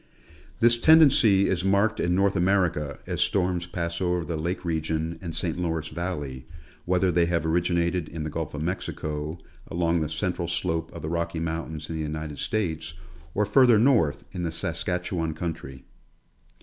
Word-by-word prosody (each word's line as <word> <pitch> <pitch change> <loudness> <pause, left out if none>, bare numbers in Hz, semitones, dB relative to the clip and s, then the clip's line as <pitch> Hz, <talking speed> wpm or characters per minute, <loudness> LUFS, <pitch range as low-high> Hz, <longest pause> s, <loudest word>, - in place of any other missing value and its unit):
This 120 0 +5
tendency 130 -11 +6
is 90 -1 0
marked 100 +3 +2
in 85 +1 +1
North 100 +1 +2
Amer 95 +1 +3
ica, 75 -3 -5
as - - -2
storms 90 -2 +1
pass 85 0 -3
over 90 -2 0
the 85 - -3
lake 90 +3 -3
region 80 0 -2
and 85 -4 -6
St. 85 +1 -2
Lawrence 80 -3 -2
valley, 75 -7 -5 0.4
whether 90 +1 +2
they' 85 -1 +3
have 85 -2 0
originated 85 0 +1
in 80 0 -5
the 75 - -4
Gulf 80 -1 -4
of 75 - -3
Mexico, 75 -3 -3 0.3
along 85 -1 0
the 75 - -1
central 85 +2 -2
slope 80 -1 -1
of 85 - -9
the 80 - -3
Rocky 85 0 -2
mountains 80 -1 -4
in 80 - -5
the - - -2
United 75 -1 -4
States, 80 -7 -2 0.4
or 105 - +2
further 120 +2 +5
north 110 - +3
in 90 - -5
the 85 -2 -2
Saskatchewan 85 0 -2
country. 80 -6 -6
85 Hz, 170 wpm, -26 LUFS, 80-90 Hz, 0.4 s, tendency